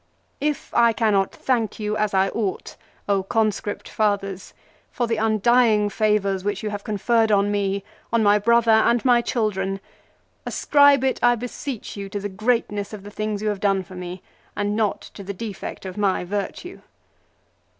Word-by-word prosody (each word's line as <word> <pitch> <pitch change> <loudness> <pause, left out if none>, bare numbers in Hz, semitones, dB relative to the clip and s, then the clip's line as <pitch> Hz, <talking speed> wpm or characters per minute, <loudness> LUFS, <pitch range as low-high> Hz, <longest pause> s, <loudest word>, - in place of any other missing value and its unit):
" - - -41
If 290 - -11
I 235 -1 +4
cannot 210 -4 +2
thank 235 -5 -1
you 210 0 -2
as 210 -2 0
I 190 +1 +3
ought, 205 -3 -3 0.5
Conscript 215 -2 -1
Fathers, 200 -3 -2 0.3
for 245 - -1
the 230 -1 -1
undying 220 -1 +3
favours 200 -3 +1
which 205 0 -2
you 210 - -2
have 205 -1 -5
conferred 225 +1 +1
on 205 0 +3
me, 200 -1 -1 0.3
on 230 -1 +2
my 205 0 +5
brother, 235 +2 +3
and 225 +2 +3
my 245 -2 +5
children, 195 -5 -1 0.6
ascribe 285 -2 +4
it, 265 - +1
I 240 0 +5
beseech 245 +1 -6
you, 200 -1 -6
to 205 0 -4
the 205 +1 -4
greatness 210 0 -1
of 205 -2 -8
the 205 - -10
things 215 0 -3
you 215 - +1
have 205 -2 -2
done 195 -1 +1
for 185 - -14
me, 180 -1 -6
HIS 180 +1 -8
RETURN - - -34
FROM - - -9
EXILE. - - +1
9 - - 0
and 205 - -1
not 215 -2 0
to 200 - -9
the 200 +1 -5
defect 205 -1 -7
of 185 +1 -7
my 195 -3 +1
virtue." 205 - -5
210 Hz, 190 wpm, -23 LUFS, 200-230 Hz, 0.6 s, my